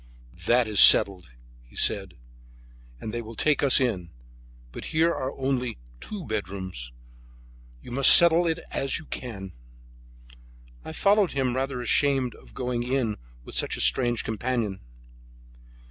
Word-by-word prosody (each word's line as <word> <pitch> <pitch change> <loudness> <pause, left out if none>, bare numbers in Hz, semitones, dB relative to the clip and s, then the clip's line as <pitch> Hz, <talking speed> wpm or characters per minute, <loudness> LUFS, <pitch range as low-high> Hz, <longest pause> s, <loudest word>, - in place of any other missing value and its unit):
"That 120 -1 +2
is 105 -2 0
settled," 95 -7 +7 0.3
he - - -23
said, - - 0 0.8
"and 110 - -8
they 120 - -4
will 115 0 -11
take 150 +4 0
us 140 -2 +5
in; 100 -10 -3 0.6
but - - -10
here 165 +2 0
are 130 +1 -5
only 130 -3 -3 0.2
two 200 -6 -8
bedrooms. 95 - -6 0.9
You - - -12
must 135 +2 +6
settle 170 0 +6
it 165 0 -2
as 135 0 -2
you 155 - -11
can." 100 -10 -8 1.3
I - - -9
followed 200 +3 +1
him, 130 -3 -2
rather 135 -1 -4
ashamed 130 0 0
of - - -19
going 125 -1 -4
in 125 -3 -3 0.3
with - - -10
such - - -2
a - - -3
strange 120 -2 +1
companion. 110 -3 -4
125 Hz, 140 wpm, -24 LUFS, 110-140 Hz, 1.3 s, settled